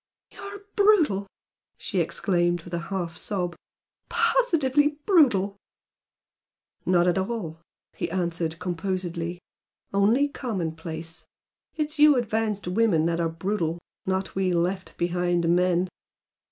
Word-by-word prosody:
"You - - -16
are 400 0 -8
brutal!" 335 - +4 0.5
she - - -2
exclaimed, 175 -3 +1
with 175 - -11
a 170 - 0
half 175 -4 -3
sob 180 -4 -2 0.5
"Positively 315 - +2
brutal!" 215 - +4 1.3
"Not 175 -1 +4
at 180 +1 +2
all!" 190 -6 -3 0.3
he - - -3
answered, 170 -2 -2
composedly 175 -1 -3 0.6
"Only 220 +8 +4
commonplace. 165 - -5 0.5
It 305 -2 -1
is 305 - -8
you 300 -1 +8
advanced 220 -4 -1
women 180 -4 +2
that 170 0 0
are 165 -1 +1
brutal, 165 0 -2 0.3
not 190 0 -1
we 190 -1 +1
left 180 +2 -1
behind 175 0 +1
men. 180 +1 +3
185 Hz, 115 wpm, -26 LUFS, 170-230 Hz, 1.3 s, you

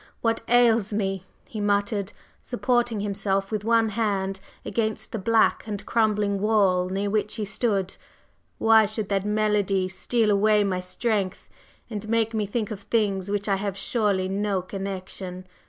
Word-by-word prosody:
What 230 -1 +1
ails 230 -3 +4
me!" 195 -3 -2 0.2
he 215 - -5
muttered, 205 0 0 0.3
supporting 240 -3 0
himself 195 -1 -1
with 210 -2 -2
one 225 0 +3
hand 195 -3 -1 0.3
against 220 -2 -2
the 220 - -3
black 225 +2 +2
and 205 -2 -5
crumbling 210 -3 +1
wall 195 -4 +3
near 195 +2 -1
which 210 +1 -1
he 215 -2 -3
stood. 195 -2 -1 0.6
"Why 225 -1 +5
should 215 -1 -4
that 195 -1 0
melody 210 -3 +1
steal 215 +3 +1
away 210 +1 +4
my 190 -2 0
strength 195 +1 -2 0.4
and 215 -2 -6
make 225 0 +1
me 215 -2 -1
think 220 +1 -2
of 205 -2 -5
things 200 -3 0
with 205 0 0
which 205 - -6
I 195 - +2
have 200 -1 -3
surely 200 -3 0
no 195 -1 -1
connection! 185 -1 -6
205 Hz, 155 wpm, -25 LUFS, 195-220 Hz, 0.6 s, Why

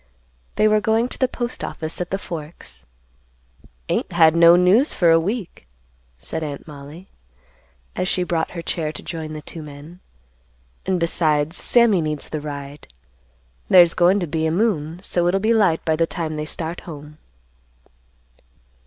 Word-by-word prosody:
They 215 - +3
were 215 0 +3
going 225 +3 +1
to - - -8
the 260 - +3
Postoffice 240 -10 -5
at 180 - -4
the 195 - -1
Forks. 150 - -9 1.0
"Ain't - - -2
had 165 -2 +5
no 170 0 +7
news 190 - +4
for 170 -2 +4
a 165 - +6
week," 190 - -4 0.5
said 160 - -5
Aunt 145 0 -6
Mollie, 150 +5 -11 0.9
as 185 - -1
she 180 - 0
brought 170 -2 -1
her 170 - -5
chair 155 -3 -2
to - - -8
join 160 -2 -6
the 155 -1 -8
two 165 - -8
men. 150 +4 -11 0.9
"And 185 -1 +1
besides, 160 -1 0
Sammy 235 -7 +4
needs 150 -2 -3
the 155 - -4
ride. 145 -1 -8 0.8
There's 175 -2 +7
goin' 180 +3 +3
to 180 - -2
be 160 0 -1
a - - 0
moon, 170 -4 0
so 175 -3 0
it'll 190 +2 +2
be 220 +3 +2
light 195 -8 +2
by 160 - +2
the 165 +1 +1
time 160 -2 -4
they 150 0 -3
start 165 +2 -5
home." 150 -1 -10
165 Hz, 160 wpm, -21 LUFS, 155-185 Hz, 1.0 s, no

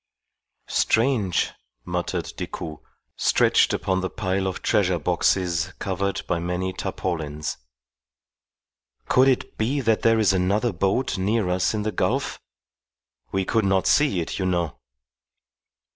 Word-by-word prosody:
"Strange!" 110 -6 +1 0.3
muttered - - -3
Decoud, 80 -3 -6 0.4
stretched - - +3
upon 95 -1 0
the 95 - -2
pile 95 -2 -1
of 95 - -4
treasure 90 -3 +2
boxes 90 +1 +1
covered 100 0 -2
by 85 - -1
many 90 +2 -2
tarpaulins. 75 -6 -3 1.5
"Could 130 +1 +5
it 130 -2 0
be 125 +6 +1
that 115 -4 +1
there 115 0 +4
is 105 -3 +3
another 100 +5 +1
boat 95 +6 0
near 105 0 +1
us 90 +4 +1
in 105 - -1
the 110 - -1
gulf? - - -1 0.9
We 95 -1 0
could 110 +3 +1
not 95 -1 +2
see 145 -11 +3
it, 80 - -4
you 95 - 0
know." 85 -8 -1
95 Hz, 130 wpm, -24 LUFS, 90-110 Hz, 1.5 s, Could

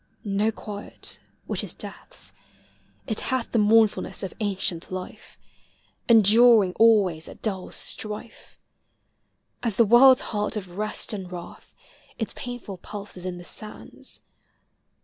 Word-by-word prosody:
Xo 205 +2 +1
quiet, 205 -1 -8 0.3
which - - -3
is - - -4
death's - - -6 0.4
— - - -36
it 220 -4 -1
hath 260 -2 -2
The 230 - +2
mournfulness 215 0 +3
of 190 - -4
ancient 190 -5 -1
life, 185 0 -8 0.7
Enduring 220 -2 +6
always 200 -8 +4
at - - -14
dull 195 -4 -3
strife. 215 +1 -6 1.0
As 230 -5 0
the 230 - +5
world's 255 +4 +7
heart 210 +1 -1
of 180 -4 -7
rest 215 +1 -1
and 190 -3 -6
wrath, 175 -1 -10 0.4
Its 225 - -3
painful 245 -6 -7
pulse 205 +3 -8
is 180 0 -4
in 180 -1 -4
the 175 - -10
sands. 215 +3 -4
210 Hz, 130 wpm, -25 LUFS, 190-225 Hz, 1.0 s, world's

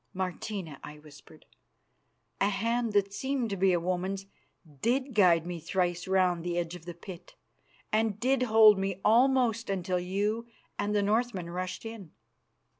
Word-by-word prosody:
"Martina," 185 -4 -4
I 150 - -9
whispered, 150 +1 -16 0.9
"a 200 - +3
hand 230 +3 -1
that 200 -1 +2
seemed 265 -2 -2
to - - -1
be 190 0 +3
a 175 - +2
woman's 185 +3 -2 0.6
did 260 +3 0
guide 175 -6 +4
me 175 -1 -5
thrice 175 +1 -1
round 185 -3 +2
the 175 0 -2
edge 170 -1 -2
of 175 -2 -10
the 175 -1 -7
pit, 175 0 -11 0.6
and 215 -1 +1
did 260 +2 +1
hold 220 -4 +6
me 195 -1 -2
almost 240 -1 +3
until 185 -2 -1
you 205 +6 -2 0.3
and 205 +1 -1
the 205 - +2
Northmen 210 -4 0
rushed 185 +4 -5
in." 220 -8 -9
195 Hz, 155 wpm, -29 LUFS, 175-225 Hz, 0.9 s, hold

